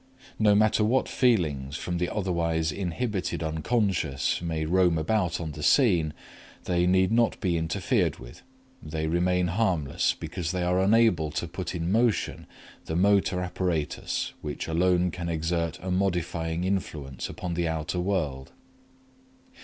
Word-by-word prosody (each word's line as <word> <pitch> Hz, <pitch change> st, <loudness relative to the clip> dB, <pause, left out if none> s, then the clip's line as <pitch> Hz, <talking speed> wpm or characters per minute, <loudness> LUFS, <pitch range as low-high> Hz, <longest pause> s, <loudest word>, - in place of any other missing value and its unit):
No 105 Hz, -2 st, +5 dB
matter 110 Hz, +1 st, +3 dB
what 125 Hz, +5 st, +2 dB
feelings 75 Hz, -, +1 dB
from 90 Hz, -1 st, -3 dB
the 90 Hz, 0 st, 0 dB
otherwise 85 Hz, -5 st, 0 dB
inhibited 95 Hz, +1 st, -2 dB
Unc. 80 Hz, 0 st, -4 dB, 0.7 s
may 80 Hz, -2 st, -2 dB
roam 90 Hz, 0 st, +3 dB
about 85 Hz, +1 st, 0 dB
on 80 Hz, -2 st, -4 dB
the 75 Hz, +1 st, -8 dB
scene, 85 Hz, -, +3 dB, 0.5 s
they 90 Hz, 0 st, +1 dB
need 95 Hz, +2 st, +3 dB
not 115 Hz, 0 st, +2 dB
be 90 Hz, -4 st, 0 dB
interfered 90 Hz, -, 0 dB
with; -, -, -12 dB, 0.4 s
they 80 Hz, -2 st, -4 dB
remain 90 Hz, +2 st, +1 dB
harmless 85 Hz, -7 st, +1 dB
because 85 Hz, +1 st, -4 dB
they 90 Hz, -1 st, -1 dB
are 90 Hz, +1 st, +2 dB
unable 95 Hz, -5 st, +3 dB
to 85 Hz, -, -2 dB
put 90 Hz, +1 st, -5 dB
in 85 Hz, +1 st, -2 dB
motion 115 Hz, +1 st, +1 dB, 0.4 s
the 80 Hz, -, -3 dB
motor 95 Hz, 0 st, +3 dB
apparatus 90 Hz, -4 st, -2 dB
which -, -, -5 dB
alone 90 Hz, +2 st, +2 dB
can 85 Hz, 0 st, -5 dB
exert 85 Hz, 0 st, -1 dB
a 95 Hz, -, -3 dB
modifying 85 Hz, -3 st, -1 dB
influence 80 Hz, -8 st, -3 dB
upon 90 Hz, -2 st, -5 dB
the 85 Hz, 0 st, 0 dB
outer 80 Hz, +2 st, -2 dB
world. 80 Hz, -8 st, -2 dB
90 Hz, 140 wpm, -27 LUFS, 80-95 Hz, 0.7 s, No